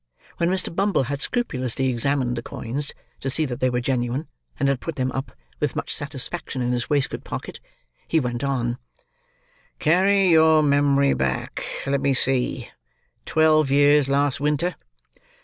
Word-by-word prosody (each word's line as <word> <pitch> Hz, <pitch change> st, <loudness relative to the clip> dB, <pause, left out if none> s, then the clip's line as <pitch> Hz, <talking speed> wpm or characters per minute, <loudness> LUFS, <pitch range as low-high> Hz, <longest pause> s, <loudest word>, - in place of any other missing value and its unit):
When 170 Hz, -, +1 dB
Mr. 185 Hz, -2 st, -1 dB
Bumble 195 Hz, -6 st, +2 dB
had 140 Hz, +2 st, -4 dB
scrupulously 130 Hz, -, -1 dB
examined 130 Hz, 0 st, 0 dB
the 120 Hz, -, -3 dB
coins, 135 Hz, +5 st, -3 dB, 0.3 s
to 135 Hz, -, -3 dB
see 155 Hz, +4 st, +1 dB
that 125 Hz, -4 st, -5 dB
they 130 Hz, -, +2 dB
were 125 Hz, 0 st, 0 dB
genuine, 125 Hz, +3 st, -1 dB, 0.3 s
and 140 Hz, -, +2 dB
had 135 Hz, -2 st, +1 dB
put 165 Hz, +2 st, -5 dB
them 130 Hz, 0 st, -1 dB
up, 135 Hz, +1 st, -4 dB, 0.3 s
with -, -, -1 dB
much -, -, -1 dB
satisfaction, 130 Hz, -, -2 dB
in 120 Hz, -, 0 dB
his 120 Hz, -1 st, -2 dB
waistcoat 145 Hz, -2 st, 0 dB
pocket, -, -, -7 dB, 0.5 s
he 165 Hz, -, +2 dB
went 125 Hz, -2 st, -3 dB
on: 125 Hz, -3 st, -1 dB, 1.0 s
"Carry 190 Hz, +4 st, +3 dB
your 160 Hz, -1 st, +5 dB
memory 140 Hz, -1 st, +3 dB
back—let 70 Hz, -, -2 dB
me 135 Hz, -1 st, +2 dB
see—twelve 135 Hz, -, 0 dB
years, 145 Hz, 0 st, +4 dB
last 140 Hz, 0 st, +2 dB
winter." 150 Hz, +5 st, 0 dB
140 Hz, 150 wpm, -23 LUFS, 125-155 Hz, 1.0 s, your